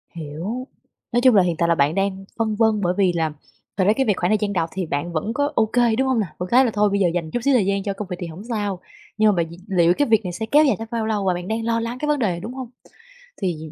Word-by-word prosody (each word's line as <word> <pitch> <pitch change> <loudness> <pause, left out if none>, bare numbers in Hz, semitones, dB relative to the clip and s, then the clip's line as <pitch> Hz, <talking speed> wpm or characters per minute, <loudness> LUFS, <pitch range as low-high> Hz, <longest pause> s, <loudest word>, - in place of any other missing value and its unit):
Hiểu, 170 - -5 0.4
nói 240 - +2
chung 255 -3 +5
là 190 - +6
hiện 175 -2 0
tại 170 - +1
là 170 - +4
bạn 145 +2 +2
đang 195 0 -1
phân 220 -2 0
vân 220 -2 +2
bởi 180 -1 +1
vì 190 -3 +3
là 160 -2 0 0.5
thật 190 - +3
ra 205 +3 +4
cái 265 +3 0
việc 210 - +3
khoảng 175 - 0
thời 215 - +3
gian 205 -1 -2
đó 165 -3 0
thì 185 -2 -3
bạn 150 +3 -3
vẫn 170 +8 -2
có 285 +3 0
ô 225 - +4
kê, 235 0 +2
đúng 265 +3 +1
hông 260 -3 +2
nào? 200 -6 -1
Vẫn 180 +1 -5
cái 255 +2 +5
là 235 - 0
thôi 210 0 +3
bây 200 0 0
giờ 185 - +3
dành 165 -3 -3
chút - - -1
xíu 280 - +3
thời 230 -7 +3
gian 200 0 0
cho 200 0 -2
công 200 0 -6
việc 180 -1 -5
thì 175 - -4
hổng 170 +5 -9
sao, 205 -5 -2 0.4
nhưng 215 0 +5
mà 200 - +2
bạn 165 - -9
d - - -9
liệu 175 -3 +3
cái 290 - +2
việc 220 -2 +3
này 180 - -4
sẽ 220 +6 -4
kéo 295 +7 +4
dài 270 - +3
tới 225 - -6
bao 230 -2 -1
lâu 210 -3 -1
và 185 - +2
bạn 175 0 -5
đang 225 +2 -2
lo 230 0 +1
lắng 230 +2 -4
cái 300 - -2
vấn 295 -1 +1
đề 240 - +1
này, 175 -2 -2
đúng 220 +7 -7
hông? 260 -2 -7 0.7
Thì 160 -5 -3
205 Hz, 325 wpm, -22 LUFS, 175-230 Hz, 0.7 s, là